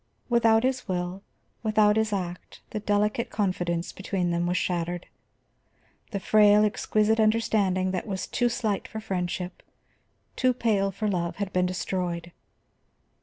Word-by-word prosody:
Without 230 -1 +4
his 255 -1 -1
will, 180 +1 -3 0.4
without 215 -1 +3
his 220 -1 +1
act, 180 -3 -5
the 215 - -2
delicate 210 +2 0
confidence 175 -4 -1
between 185 -2 -2
them 170 0 0
was 180 +1 +1
shattered. 175 -1 -2 1.0
The 200 - -3
frail, 210 +1 +5
exquisite 215 0 +1
understanding 210 -4 +2
that 185 +2 -3
was 190 -2 -3
too 245 -1 +1
slight 220 -4 -1
for 220 - -6
friendship, 180 -3 -3 0.7
too 255 -1 +2
pale 205 -5 +1
for 205 +3 -3
love, 175 -4 -1
had 200 -1 -4
been 180 0 +2
destroyed. 180 -2 -3
200 Hz, 135 wpm, -26 LUFS, 180-215 Hz, 1.0 s, frail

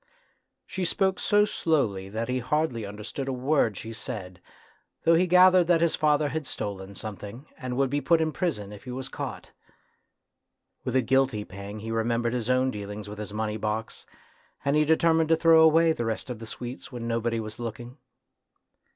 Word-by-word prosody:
She 190 - -4
spoke 190 +1 +1
so 205 0 +4
slowly 110 - 0
that 110 +3 -3
he 130 0 0
hardly 125 -4 -1
understood 105 +7 -6
a - - 0
word 130 -5 +1
she 115 0 -7
said, 95 -4 -7 0.6
though 165 - +5
he 175 +2 +4
gathered 180 0 +6
that 170 -1 +4
father 150 -1 +2
had 150 0 -4
stolen 100 -1 -5
something, 105 +5 -8
and 130 -4 -5
would 135 -1 +1
be 145 0 0
put 165 +4 +3
in 160 -1 +1
prison 120 - -2
if 105 - -12
he - - -8
was 130 +1 -5
caught. - - -6 1.3
With - - -3
a 130 - +4
guilty 130 -4 +2
pang 100 +2 -8
he 115 +1 -5
remembered 115 +1 0
his 120 -1 -2
own 130 +1 +3
dealings 105 0 -6
with 105 +1 -8
his 105 -1 -5
money 105 0 -2
box, 110 +1 -4 0.6
and 140 +1 +2
he 150 0 +4
deter 160 +1 +4
mined 160 -1 +2
to 165 - +6
throw 165 0 +6
away 160 +1 +5
the 120 - -3
rest 115 +3 -3
of 120 - -6
the 115 - -8
sweets 125 +4 -7
when 120 -2 -5
nobody 115 0 0
was 110 +1 -6
looking. 120 +2 -6
125 Hz, 185 wpm, -27 LUFS, 110-155 Hz, 1.3 s, gathered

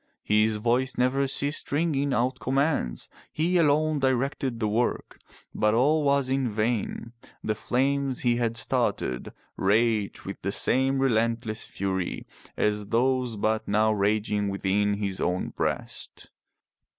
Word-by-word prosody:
His 105 +1 +2
voice 120 +4 0
never 135 +2 +2
ceased 140 +3 -1
ringing 145 -2 +1
out 130 +1 0
commands. 135 - 0 0.2
He 175 +4 +1
alone 155 -1 +2
directed 130 -1 0
the 110 - 0
work. 115 +4 -1 0.3
But 105 +1 +2
all 150 +6 +3
was 140 -2 +2
in 130 -1 0
vain. 115 +1 -2 0.3
The 110 - 0
flames 135 +3 0
he 120 -1 +2
had 115 -1 -1
started 65 - -1 0.3
raged 105 +1 +1
with 95 - -7
the 100 - -2
same 135 +5 +2
relentless 115 -3 0
fury 95 -2 -3 0.3
as 105 -1 0
those 125 +1 +1
but 110 +1 -1
now 110 +1 +3
raging 105 0 0
within 100 +1 0
his 100 -2 -3
own 90 +1 -1
breast. - - -4
115 Hz, 130 wpm, -26 LUFS, 105-135 Hz, 0.3 s, all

